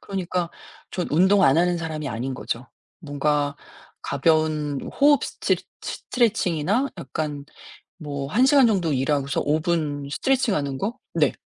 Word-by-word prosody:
그러니까 180 Hz, -3 st, -3 dB, 0.4 s
전 180 Hz, -, -2 dB
운동 190 Hz, +6 st, +4 dB
안 135 Hz, -4 st, +5 dB
하는 175 Hz, +1 st, +2 dB
사람이 155 Hz, -3 st, -4 dB
아닌 125 Hz, +3 st, -3 dB
거죠. 125 Hz, 0 st, -4 dB, 0.3 s
뭔가 145 Hz, -2 st, -1 dB, 0.5 s
가벼운 150 Hz, -1 st, +1 dB
호흡 285 Hz, 0 st, +4 dB
스트레츠 -, -, -1 dB, 0.2 s
스트레칭이나 220 Hz, -, 0 dB
약간 150 Hz, -1 st, -4 dB, 0.5 s
뭐 140 Hz, -4 st, -5 dB
1 225 Hz, -, +3 dB
시간 270 Hz, -2 st, +6 dB
정도 180 Hz, -8 st, +1 dB
일하고서 140 Hz, +1 st, 0 dB
5 150 Hz, +2 st, +1 dB
분 150 Hz, -4 st, -1 dB
스트레칭 260 Hz, -, +1 dB
하는 140 Hz, -2 st, -2 dB
거? 210 Hz, -, -3 dB, 0.2 s
네. -, -, +2 dB
155 Hz, 280 characters per minute, -24 LUFS, 145-190 Hz, 0.5 s, 시간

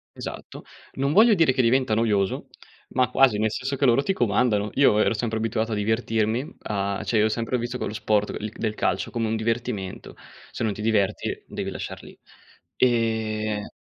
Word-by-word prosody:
Esatto. -, -, -8 dB, 0.3 s
Non 140 Hz, +2 st, 0 dB
voglio 220 Hz, +5 st, +7 dB
dire 165 Hz, -7 st, +4 dB
che 130 Hz, -, +2 dB
diventa 125 Hz, -1 st, +2 dB
noioso, 105 Hz, -4 st, 0 dB, 0.4 s
ma 130 Hz, -1 st, +1 dB
quasi 130 Hz, -6 st, +4 dB
nel 110 Hz, 0 st, +1 dB
senso 130 Hz, +4 st, -3 dB
che 140 Hz, +1 st, +1 dB
loro 125 Hz, +2 st, +4 dB
ti 195 Hz, -, 0 dB
comandano. 105 Hz, -, +1 dB
Io 135 Hz, -6 st, +5 dB
ero 110 Hz, -, +3 dB
sempre 110 Hz, 0 st, -2 dB
abituato 110 Hz, 0 st, -1 dB
a -, -, 0 dB
divertirmi, 110 Hz, +3 st, -1 dB
a 100 Hz, -1 st, -2 dB
cioè 115 Hz, -, 0 dB
io 105 Hz, -, +4 dB
ho 110 Hz, -, +2 dB
sempre 115 Hz, +3 st, -1 dB
visto 120 Hz, +1 st, -4 dB
quello 110 Hz, -, -4 dB
sport 105 Hz, -1 st, 0 dB
l 105 Hz, -, -4 dB
del 110 Hz, -2 st, -2 dB
calcio -, -, -1 dB
come 115 Hz, -2 st, -1 dB
un 110 Hz, -, -1 dB
divertimento. 110 Hz, -4 st, -3 dB, 0.4 s
Se -, -, -4 dB
non 110 Hz, -2 st, 0 dB
ti 105 Hz, -, -8 dB
diverti 105 Hz, -3 st, 0 dB
devi -, -, -4 dB
lasciar -, -, -6 dB
lì. -, -, -13 dB, 0.6 s
Ehm 110 Hz, -3 st, 0 dB
110 Hz, 185 wpm, -24 LUFS, 105-125 Hz, 0.6 s, voglio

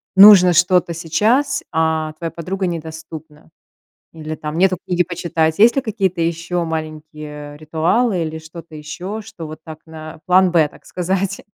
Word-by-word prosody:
нужно 190 Hz, -2 st, +9 dB
что-то 180 Hz, 0 st, +3 dB
сейчас, 215 Hz, -, +1 dB
а 160 Hz, -1 st, 0 dB
твоя 165 Hz, +1 st, -6 dB
подруга 185 Hz, +3 st, -3 dB
недоступна? 160 Hz, -2 st, -8 dB, 0.6 s
Или 155 Hz, -1 st, -6 dB
там 150 Hz, 0 st, -6 dB
нету 185 Hz, 0 st, +3 dB
книги 180 Hz, 0 st, +1 dB
почитать. 165 Hz, -3 st, -1 dB
Есть 230 Hz, +3 st, +6 dB
ли 275 Hz, -, +1 dB
какие-то 195 Hz, -6 st, -2 dB
ещё 170 Hz, +1 st, -1 dB
маленькие, 155 Hz, -2 st, -7 dB
э, -, -, -13 dB
ритуалы 170 Hz, +7 st, 0 dB
или 160 Hz, 0 st, -5 dB
что-то 160 Hz, 0 st, -12 dB
ещё, 180 Hz, +8 st, -6 dB
что 175 Hz, -6 st, -9 dB
вот 155 Hz, +1 st, -9 dB
так 160 Hz, -1 st, -10 dB
на 155 Hz, -1 st, -10 dB
план 185 Hz, 0 st, +4 dB
Б, 165 Hz, -3 st, +4 dB
так -, -, -20 dB
сказать? 190 Hz, +2 st, -2 dB
165 Hz, 155 wpm, -19 LUFS, 155-185 Hz, 0.6 s, нужно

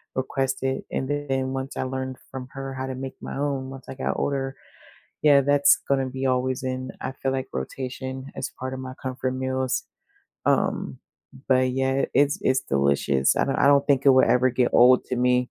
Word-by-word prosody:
requested, 135 Hz, 0 st, -1 dB
and 130 Hz, -, -2 dB, 0.2 s
then 130 Hz, 0 st, -1 dB
once 135 Hz, 0 st, -5 dB
I -, -, 0 dB
learned 130 Hz, 0 st, -4 dB
from 130 Hz, -1 st, -6 dB
her 135 Hz, 0 st, -5 dB
how 130 Hz, 0 st, -4 dB
to 130 Hz, -, -4 dB
make 135 Hz, 0 st, -6 dB
my -, -, -6 dB
own 140 Hz, -2 st, -2 dB
once 135 Hz, -1 st, -10 dB
I -, -, -5 dB
got 130 Hz, -, -2 dB
older, 135 Hz, -1 st, -1 dB, 0.7 s
yeah, 145 Hz, -2 st, +6 dB
that's 145 Hz, +1 st, +5 dB
gonna 135 Hz, -1 st, +1 dB
be 130 Hz, +1 st, -3 dB
always 130 Hz, 0 st, 0 dB
in, 130 Hz, 0 st, -3 dB
I -, -, -4 dB
feel, 135 Hz, -, +1 dB
like, 130 Hz, -1 st, -3 dB
rotation 130 Hz, -, -5 dB
as -, -, -3 dB
part 130 Hz, 0 st, -3 dB
of 130 Hz, -, -6 dB
my 130 Hz, 0 st, -7 dB
comfort 130 Hz, 0 st, -2 dB
meals, 130 Hz, 0 st, -1 dB, 0.6 s
um, -, -, 0 dB, 0.5 s
but 130 Hz, -1 st, +3 dB
yeah, 135 Hz, +1 st, +1 dB
it's 145 Hz, 0 st, +3 dB
it's 130 Hz, 0 st, +2 dB
delicious, 70 Hz, -1 st, +2 dB
I -, -, +3 dB
don't 135 Hz, -, 0 dB
I -, -, +3 dB
don't 140 Hz, -1 st, +5 dB
think 140 Hz, -2 st, +3 dB
it -, -, +9 dB
will 130 Hz, 0 st, +6 dB
ever 125 Hz, +1 st, +4 dB
get 125 Hz, 0 st, +1 dB
old 125 Hz, +1 st, +6 dB
to 125 Hz, -, -2 dB
me. 125 Hz, 0 st, +2 dB
130 Hz, 195 wpm, -25 LUFS, 130-135 Hz, 0.7 s, it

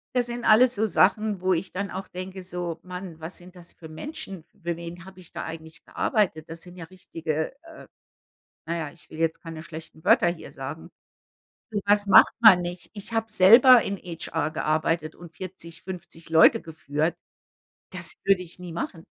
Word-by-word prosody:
Das 245 Hz, -1 st, +2 dB
sind 240 Hz, 0 st, -5 dB
alles 240 Hz, +3 st, +6 dB
so 215 Hz, +2 st, +1 dB
Sachen, 210 Hz, -1 st, +2 dB
wo 185 Hz, 0 st, +1 dB
ich 175 Hz, +2 st, -3 dB
dann 200 Hz, +1 st, -3 dB
auch 190 Hz, +1 st, -6 dB
denke, 185 Hz, +1 st, -7 dB
so: 175 Hz, -2 st, -5 dB
„Mann, 180 Hz, -2 st, -8 dB
was 160 Hz, +3 st, -7 dB
sind 180 Hz, +1 st, -14 dB
das 170 Hz, -1 st, -11 dB
für 160 Hz, -, -12 dB
Menschen, 185 Hz, -, -7 dB, 0.2 s
für 170 Hz, -1 st, -2 dB
wen 170 Hz, 0 st, -8 dB
habe 190 Hz, 0 st, -14 dB
ich 180 Hz, -, -14 dB
da -, -, -5 dB
eigentlich 160 Hz, 0 st, -9 dB
gearbeitet? 175 Hz, -, -1 dB
Das 165 Hz, 0 st, -8 dB
sind 180 Hz, 0 st, -12 dB
ja 165 Hz, -, -7 dB
richtige“ 165 Hz, -3 st, -4 dB
äh, 325 Hz, -1 st, -13 dB, 0.8 s
na 170 Hz, +1 st, -2 dB
ja, 160 Hz, -3 st, -4 dB
ich 170 Hz, +3 st, -17 dB
will -, -, -11 dB
jetzt 165 Hz, 0 st, 0 dB
keine 165 Hz, -2 st, -7 dB
schlechten 160 Hz, -1 st, -11 dB
Wörter -, -, +5 dB
hier 170 Hz, -1 st, -4 dB
sagen. -, -, -8 dB, 0.8 s
Sowas 205 Hz, -1 st, +2 dB
macht 200 Hz, -, +7 dB
man 200 Hz, -6 st, +8 dB
nicht. 175 Hz, 0 st, -6 dB
Ich 205 Hz, +2 st, -9 dB
habe 225 Hz, 0 st, -1 dB
selber 230 Hz, +5 st, +8 dB
in 200 Hz, 0 st, -4 dB
HR 165 Hz, -2 st, -3 dB
gearbeitet 155 Hz, 0 st, -1 dB
und 170 Hz, -2 st, -14 dB
40, 170 Hz, -3 st, -9 dB
50 170 Hz, -3 st, -9 dB
Leute 160 Hz, 0 st, +6 dB
geführt. 155 Hz, 0 st, -2 dB, 0.8 s
Das -, -, -1 dB
würde 195 Hz, -2 st, +3 dB
ich 175 Hz, 0 st, -12 dB
nie 180 Hz, -2 st, -8 dB
machen. 165 Hz, 0 st, -5 dB
175 Hz, 185 wpm, -25 LUFS, 165-195 Hz, 0.8 s, man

